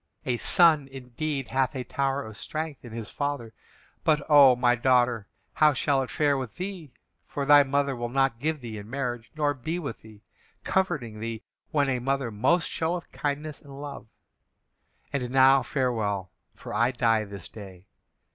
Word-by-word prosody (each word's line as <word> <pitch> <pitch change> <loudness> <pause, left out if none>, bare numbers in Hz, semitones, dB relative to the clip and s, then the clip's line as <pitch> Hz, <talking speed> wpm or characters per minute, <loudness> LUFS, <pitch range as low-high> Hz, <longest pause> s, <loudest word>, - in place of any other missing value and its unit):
A 125 -1 0
son, 155 -1 +4
indeed, 135 +2 -5
hath 135 +1 +1
a 130 - -3
tower 135 +2 -1
of 110 -1 -9
strength 155 +4 -5
in 120 - -10
his 115 0 -6
father. 140 -6 -3 0.5
But, 150 -2 +2
O 140 -3 +8
my 120 0 +3
daughter, 120 -3 +2 0.3
how 150 -1 +5
shall 140 0 +1
it 130 - -4
fare 145 -2 +2
with 130 -4 -5
thee, 180 -6 -6 0.4
for 140 - -3
thy 145 0 +8
mother 140 0 0
will 120 0 -4
not 135 -2 +1
give 155 +1 -1
thee 110 -3 -6
in 105 +1 -11
marriage, 120 -3 -3
nor 145 -2 +1
be 155 +6 -4
with 140 -9 -6
thee, 110 -1 -16 0.4
comforting 125 - -1
thee 115 +1 -5 0.3
when 145 -3 +2
a 130 -2 0
mother 135 -1 -1
most 130 +12 +2
showeth 170 +2 -2
kindness 145 +1 -3
and 140 -1 -12
love. 145 -5 -8 1.1
And 125 -3 -1
now 135 +1 +6
farewell, 110 - -1 0.2
for - - -9
I 115 +3 +3
die 115 -3 +2
this 100 -3 -9
day. 95 -4 -12
135 Hz, 170 wpm, -27 LUFS, 115-145 Hz, 1.1 s, O